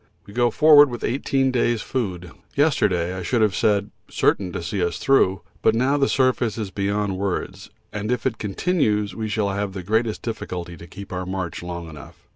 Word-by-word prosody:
We 100 - -13
go 120 +1 +3
forward 145 +2 +7
with 120 -1 -6
eighteen 135 +1 +1
days' 120 -2 +1
food. 90 -9 -3 0.2
Yesterday 95 - +2
I 95 - -5
should 110 +5 +1
have 105 -3 +2
said 105 -2 +1 0.2
certain 95 -3 +1
to 85 - -5
see 90 +2 -2
us 85 0 -1
through, 95 -8 +2 0.2
but 110 - +3
now 130 +5 +2
the 140 -1 +2
surface 130 -4 +1
is 105 -4 -4
beyond 100 -1 -1
words, 100 -2 -3 0.2
and 105 +2 -3
if 125 -2 -1
it 115 -4 -1
continues 105 - 0
we 110 -1 -4
shall 105 -1 0
have 100 0 -3
the 95 -2 -6
greatest 110 +3 0
difficulty 90 -6 -5
to 85 - -12
keep 100 +1 -9
our 90 0 -4
march 95 -2 -4
long 85 -1 -6
enough. 75 -2 -11
105 Hz, 195 wpm, -23 LUFS, 95-120 Hz, 0.2 s, forward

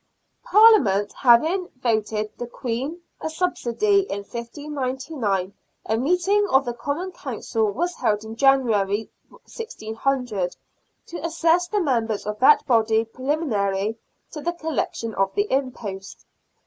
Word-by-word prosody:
Parliament 375 - +5
having 320 +10 +3
voted 215 -3 -1
the 240 - -4
Queen 255 +7 -4 0.2
a - - -3
subsidy 360 - +1
in 200 - -3
1599, 255 - -3 0.3
a 220 - 0
meeting 360 - +2
of 270 -2 +4
the 240 - -2
Common 285 +10 -4
Council 225 - -2
was 350 - -2
held 215 -8 0
in 220 0 -8
January, 225 -6 +2 0.2
1600, 245 - -3 0.5
to 340 - -8
assess 335 +1 +2
the 415 +3 0
members 230 - 0
of 210 0 -4
that 280 +3 +6
body 225 -3 +3
preliminary 225 -6 -1 0.3
to 300 - -7
the 345 +3 -1
collection 310 -8 -3
of 195 0 0
the 410 0 +2
impost. 225 -8 -4
250 Hz, 120 wpm, -23 LUFS, 220-320 Hz, 0.5 s, that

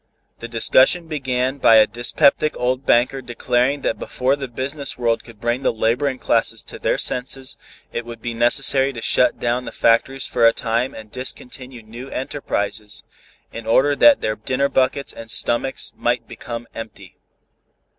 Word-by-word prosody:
The 115 - -6
discussion 130 +8 +3
began 130 -3 -2
by 115 - +6
a 110 -1 +7
dyspeptic 140 +5 +1
old 125 +2 -1
banker 130 +3 +3
declaring 125 +3 0
that - - -1
before 130 +2 0
the 140 -1 -5
business 135 +3 -4
world 115 -2 0
could 115 -3 -15
bring 120 +3 -1
the - - +2
laboring 125 +5 0
classes 115 -2 0
to - - -10
their - - 0
senses 130 +1 -4 0.4
it 120 - -3
would 115 -1 -9
be 120 +1 -4
necessary 135 +3 +2
to 115 - -7
shut 125 - +2
down 120 +1 -1
the - - -6
factories 130 +4 +2
for 115 -2 +3
a 115 - +4
time 115 +2 -1
and 110 -1 -11
discontinue 125 -1 -8
new 120 +5 -10
enterprises 110 -6 -4 0.5
in 115 -1 -8
order 140 +5 +3
that 290 - +6
their 110 - -1
dinner 130 +6 -1
buckets 135 +1 0
and 115 -1 -10
stomachs 120 +4 0
might 120 -1 -1
become 120 0 -7
empty. 115 -1 -10
125 Hz, 165 wpm, -21 LUFS, 115-135 Hz, 0.5 s, a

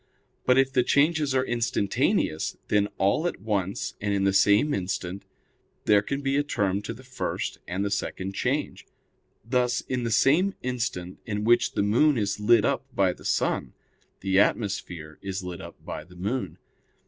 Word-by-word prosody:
But 125 0 +5
if 135 0 +3
the 125 - +4
changes 145 +1 +2
are 130 0 +2
instantaneous, 110 -9 0
then 105 -1 +3
all 100 - +2
at - - -4
once 100 -2 -2
and 100 -1 0
in 100 - +1
the 95 0 +3
same 105 +9 +4
instant 95 0 -3 0.6
there 105 -1 +5
can 140 +7 -3
be 135 0 0
a 145 - +2
term 100 -8 0
to 105 - -5
the 130 - -13
first 130 0 -4
and 95 +3 -2
the 100 - -2
second 95 0 -3
change; - - -2 0.6
thus 125 0 +1
in 125 -1 -3
the 115 - -1
same 155 - +3
instant 110 -8 -3
in 105 -1 -2
which 120 +2 +3
the - - +1
moon 125 +8 +3
is 100 -2 -1
lit 110 +1 +4
up 135 -3 0
by 95 -5 +3
the - - -16
sun, - - 0 0.5
the 95 0 +2
atmosphere 90 -8 -1
is 95 -1 -4
lit 90 -1 -6
up - - -10
by - - -5
the 90 - -17
moon. 95 -2 -3
105 Hz, 175 wpm, -26 LUFS, 95-125 Hz, 0.6 s, But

